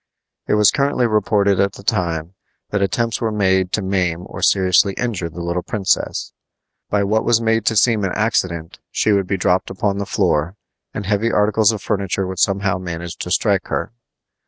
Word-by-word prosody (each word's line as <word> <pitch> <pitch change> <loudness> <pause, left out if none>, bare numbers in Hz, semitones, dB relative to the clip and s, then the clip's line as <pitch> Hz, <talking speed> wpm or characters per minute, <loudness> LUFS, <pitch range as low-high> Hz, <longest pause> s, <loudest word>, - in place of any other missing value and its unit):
It - - +2
was 105 -2 +5
currently 140 -3 +1
reported 100 -3 +2
at 100 0 +2
the - - -12
time 85 -2 -1 0.4
that 105 - 0
attempts 115 +4 -1
were 115 -1 0
made 95 -3 +1
to 105 - 0
maim 90 -3 -1
or 95 - -9
seriously 95 0 +3
injure 105 -9 -2
the 85 +2 -7
little 85 +1 -2
princess. 100 +1 -1 0.6
By 105 -1 +1
what 110 +3 +1
was 120 -1 +3
made 115 -1 +1
to 110 - +2
seem 110 -1 +3
an 95 - -1
accident, 90 -7 -1
she 110 - +1
would 100 -2 +1
be 100 - -1
dropped 90 0 +1
upon 100 +1 -1
the 100 - -3
floor, 75 +6 0 0.4
and 100 - -5
heavy 105 +3 +1
articles 105 +1 +3
of 105 -3 -6
furniture 100 -2 -1
would 95 0 -5
somehow 100 -1 +1
manage 85 -2 -6
to - - -5
strike - - +1
her. - - -3
100 Hz, 185 wpm, -19 LUFS, 90-105 Hz, 0.6 s, was